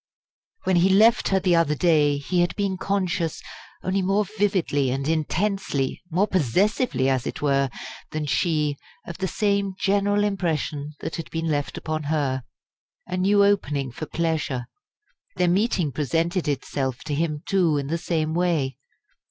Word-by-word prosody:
When 185 -1 +2
he 180 +3 +4
left 220 +5 +5
her 195 - +2
the 180 -2 +3
other 165 -3 +2
day 150 -3 +3
he 145 +6 0
had 175 - 0
been 200 -2 -1
conscious, 185 -3 -1 0.4
only 190 +1 0
more 195 +3 +1
vividly 190 -9 0
and 135 +2 -2
intensely, 160 -2 -1
more 185 +5 +2
possessively 185 - +1
as 130 -1 +1
it - - -5
were, 140 -1 +2 0.4
than 155 -1 -3
she, 150 -1 +1 0.3
of 170 +1 -8
the 190 - 0
same 200 -1 0
general 205 +1 +2
impression 155 -7 -2
that - - -4
had 165 - -6
been 165 0 -3
left 145 -3 -1
upon 155 -1 -3
her. 140 -3 0 0.6
A 180 - -4
new 200 +2 +4
opening 145 -10 +1
for 155 +6 -6
pleasure 155 -6 -1 0.7
their 180 - +2
meeting 180 - +1
presented 165 +5 -1
itself 135 -2 -2
to 150 - -4
him, 150 0 -1
too, 175 -6 +2
in 140 - -2
the 165 +4 -2
same 160 -2 -1
way. 165 -7 0
165 Hz, 155 wpm, -24 LUFS, 145-190 Hz, 0.7 s, left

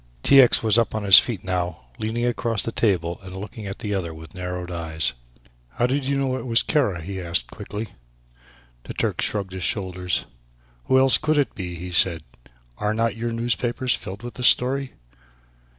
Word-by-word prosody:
T. 140 -1 +8
X. 125 - +4
was 110 0 +4
up 115 - 0
on 110 - -2
his 100 -2 +10
feet 120 -8 -4
now, 90 -5 -3 0.2
leaning 115 +2 -2
across 115 -2 0
the 115 - -3
table 90 -5 0
and 95 -1 -10
looking 105 +1 -7
at 100 - -6
the 105 -1 -4
other 85 -4 -3
with 80 0 -12
narrowed 90 -1 -5
eyes. 80 -2 -1 0.6
"How 120 - +1
did 135 +2 0
you 140 +1 0
know 135 -2 0
it 130 - -7
was 115 -1 +3
Kara?" 105 - 0
he 95 +1 -5
asked 85 -8 -2
quickly. 105 +2 -6 1.0
The - - -7
Turk - - -1
shrugged 100 -3 -1
his 95 - -6
shoulders. 90 -2 -1 0.6
"Who 130 - +3
else 130 0 +5
could 155 0 +1
it 140 -5 +1
be?" 90 -3 -6
he 90 +2 -7
said; 85 -2 +2 0.6
"are 105 +1 0
not 115 -1 0
your 115 +1 -3
newspapers 120 +2 -1
filled 100 +4 -6
with 120 - -7
the 125 - -7
story?" 130 +2 +3
105 Hz, 190 wpm, -23 LUFS, 90-120 Hz, 1.0 s, his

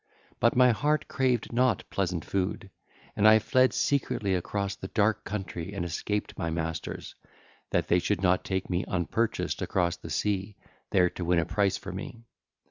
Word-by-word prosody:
But 115 - +3
my 125 0 +6
heart 150 +6 0
craved 125 -4 0
not 125 -3 +2
pleasant 90 -4 -1
food, 95 0 -2 0.4
and 105 - +4
I 110 0 +8
fled 130 +3 +3
secretly 115 -8 0
across 100 +2 -2
the 95 - -7
dark 105 0 +1
country 95 -3 -5
and 85 - -2
escaped 105 +5 -3
my 85 -3 -1
masters, 80 0 -4 0.6
that - - 0
they 90 - +4
should 100 +1 -1
not 90 0 +3
take 95 -1 -2
me 90 0 0
unpurchased 95 +6 -1
across 90 -2 0
the - - -10
sea, 100 0 -1 0.3
there 90 -2 +3
to 90 - -5
win 90 +1 +2
a 85 - +2
price 100 0 +1
for 100 - -7
me. 115 +5 -7
100 Hz, 170 wpm, -28 LUFS, 90-110 Hz, 0.6 s, I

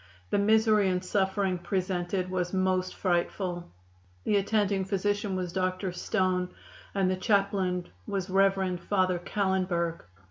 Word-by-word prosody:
The - - +3
misery 215 -1 +4
and 180 0 -1
suffering 190 -1 0
presented 185 0 -2
was 180 -1 -1
most 185 -1 +1
frightful. 175 -1 -1 0.5
The 205 - +2
attending 200 -1 +1
physician 205 +1 -1
was 180 -2 -3
Dr. 185 0 -1
Stone, 180 0 0 0.5
and 195 -2 +2
the 185 - +1
chaplain 190 -2 +1 0.2
was 195 -2 -2
Rev. 195 -1 +2
Father 185 0 +1
Callenberg. 180 -3 0
185 Hz, 120 wpm, -28 LUFS, 180-195 Hz, 0.5 s, misery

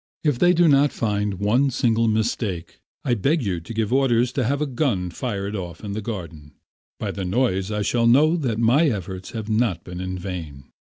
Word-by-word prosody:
If 145 -6 +1
they 175 0 +5
do 175 -1 +4
not 145 -1 +4
find 105 -2 -1
one 110 +9 +2
single 115 -2 +1
mistake, 110 -5 -2 0.3
I 125 - +2
beg 140 - +1
you 95 -5 -1
to 85 - -11
give 110 0 -1
orders 125 -2 +3
to 130 - -1
have 140 +4 0
a 150 - 0
gun 120 - -1
fired 100 -1 -3
off 90 -3 -6
in 105 - -5
the 105 +2 -3
garden. 85 -9 -7 0.5
By - - -2
the 100 - -5
noise 95 -1 0
I 105 -1 -1
shall 115 +3 +2
know 150 +7 +5
that 130 -10 -1
my 120 +8 +4
efforts 95 -4 -5
have 110 -2 -5
not 110 -6 0
been 90 0 -7
in 95 0 -4
vain. 85 -7 -7
110 Hz, 205 wpm, -23 LUFS, 95-125 Hz, 0.5 s, they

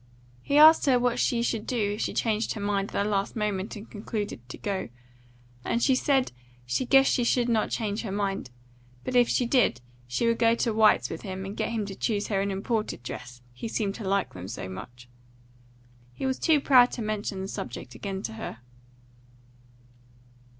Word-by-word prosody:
He 280 - +1
asked 310 0 +8
her 260 -2 +5
what 245 0 +1
should 235 -1 +1
she 225 - 0
do 210 -2 -1
if 210 - -4
she - - -1
changed 220 -1 0
her - - -5
mind 200 -1 -1
at - - 0
the - - -1
last 200 -2 -1
moment 210 -2 -2
and 210 +2 -9
concluded 210 - -4
to - - -7
go, 195 - -3 0.7
and 235 - 0
she 265 - +4
said 265 0 +2 0.3
she 125 - -1
guessed 270 +1 +5
she 245 - +2
should 240 0 +2
not 225 -3 +1
change 210 -2 -2
her 215 - -5
mind, 195 -7 -2 0.5
but 255 - -3
if 245 -1 +5
she 250 - +2
did, 240 - +2 0.3
she 125 - -1
would 230 0 +2
go 230 0 +4
to 235 -1 0
White's 215 - +4
with 165 - -5
him 190 -1 -5
and 195 +2 -6
get - - -1
him 225 -3 -2
to 200 - -6
choose 205 +1 -1
her 195 -2 +1
an 200 - -1
imported 205 - -2
dress, 125 0 -8
he 125 - -6
seemed 210 -3 -1
to 220 - -8
like 195 -1 0
them 90 0 -8
so 100 -2 -6
much. 120 +6 -9 1.1
He 265 - -5
was 265 0 -1
too 315 -3 +4
proud 255 -3 +6
to 235 - -4
mention 210 -2 -3
the 190 - -4
subject 125 -8 -6
again 190 - -5
to 110 - -4
her. 110 - -6
210 Hz, 200 wpm, -27 LUFS, 195-235 Hz, 1.1 s, asked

